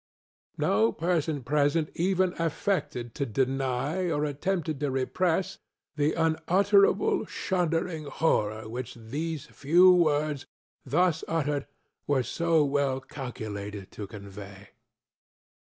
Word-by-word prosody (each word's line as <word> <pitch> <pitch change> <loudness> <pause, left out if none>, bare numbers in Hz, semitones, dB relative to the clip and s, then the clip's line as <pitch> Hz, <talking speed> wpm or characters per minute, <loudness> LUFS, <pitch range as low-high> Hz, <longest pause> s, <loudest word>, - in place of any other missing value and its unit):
ŌĆØ - - -42
No 110 +3 +3
person 160 -4 -1
present 150 +4 +1
even 185 +1 +1
affected 165 - -1
to - - -2
deny, 135 - -1
or 150 -2 0
attempted 155 +1 -2
to 145 -1 0
repress, 165 +7 0 0.4
the 150 +1 +1
unutterable, 195 +5 +3
shuddering 170 -3 -1
horror 110 -8 0
which 120 +2 -6
these 145 +6 -4
few 175 +7 +5
words, 150 -4 +1 0.4
thus 160 +4 +1
uttered, 145 -3 -1 0.4
were 140 -3 +2
so 165 +1 +2
well 140 -2 +1
calculated 105 -7 -7
to 105 - -7
convey. 100 -1 -10
145 Hz, 105 wpm, -28 LUFS, 130-165 Hz, 0.4 s, few